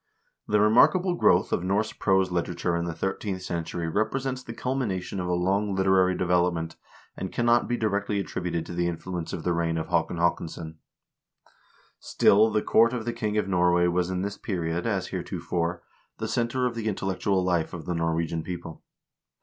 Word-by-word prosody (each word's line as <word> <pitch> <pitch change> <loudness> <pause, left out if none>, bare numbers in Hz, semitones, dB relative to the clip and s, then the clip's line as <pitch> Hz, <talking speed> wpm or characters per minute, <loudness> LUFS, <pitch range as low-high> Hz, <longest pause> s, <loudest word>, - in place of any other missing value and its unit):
The 105 - +3
remarkable 150 - +5
growth 175 - +3
of - - 0
Norse 100 +4 0
prose 95 -2 +2
literature 85 0 -1
in 85 0 -1
the 85 -1 -4
thirteenth 95 +2 -3
century 85 -1 -3
represents 130 +8 -1
the 120 - -8
culmination 115 -7 -2
of 90 - -2
a 90 - 0
long 95 +3 +1
literary 95 -1 +3
development, 85 -2 +1 0.4
and 95 - -5
cannot 120 0 +2
be 120 - 0
directly 105 -2 0
attributed 90 -3 -3
to - - -7
the 85 0 0
influence 85 0 -4
of - - -5
the 90 - +1
reign 85 -1 0
of 80 - -4
Haakon 85 0 0
Haakonsson. 80 -1 -2 1.2
Still 105 +3 +4
the 105 -1 0
court 115 +2 +4
of 120 -3 -3
the 120 - -2
king 110 -3 -2
of 105 - +1
Norway 90 -1 +3
was 90 0 +1
in 95 0 -2
this 100 0 -4
period, 85 -1 -2
as 95 -5 -1
heretofore, 85 0 -3 0.3
the - - -3
center 120 +2 0
of 125 - 0
the 115 -2 -4
intellectual 95 -1 0
life 85 -3 0
of 80 -3 -7
the 90 - -2
Norwegian 80 0 -1
people. 85 -1 -7
95 Hz, 175 wpm, -26 LUFS, 85-105 Hz, 1.2 s, remarkable